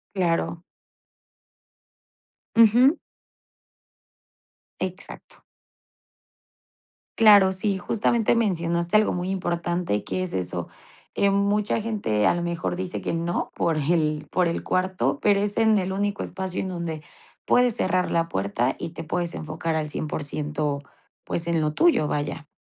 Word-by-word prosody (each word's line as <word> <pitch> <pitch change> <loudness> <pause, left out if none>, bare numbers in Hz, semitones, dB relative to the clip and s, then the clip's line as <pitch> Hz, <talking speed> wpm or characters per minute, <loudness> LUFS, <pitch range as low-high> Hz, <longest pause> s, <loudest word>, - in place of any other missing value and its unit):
Claro. 170 -2 0 1.9
Ujú. 240 - +6 1.8
Exacto. 185 +1 -6 1.8
Claro, 205 -4 +7
sí, 195 +1 0
justamente 225 +4 +1
mencionaste 170 -4 +1
algo 215 - +3
muy 180 +1 -3
importante, 175 - -1
que 185 - -3
es 185 - -3
eso, 90 -2 -3 0.5
eh, 200 - +3
mucha 200 +2 +1
gente, 205 - 0
a - - +4
lo 175 - -2
mejor, 170 0 -2
dice 185 0 -4
que - - -2
no 170 +1 -2
por 165 -2 0
el 155 0 0
por 180 -2 +2
el 170 - -2
cuarto, 185 -8 0
pero 205 -1 +3
es 205 +1 -1
en 220 -2 +4
el 190 0 -2
único 200 +1 -1
espacio 190 0 -4
en 190 - -4
donde 170 -4 -4 0.4
puedes 245 -2 +3
cerrar 185 -3 0
la 165 0 +1
puerta 100 +5 -1
y 165 - -5
te 165 - -8
puedes 170 +2 -2
enfocar 160 +1 -3
al 150 -1 -2
100%, 150 -1 -3 0.4
pues, 170 0 -2
en 170 -1 +1
lo 150 0 -1
tuyo, 330 - +3
vaya. 145 +1 -3
175 Hz, 135 wpm, -24 LUFS, 155-200 Hz, 1.9 s, Claro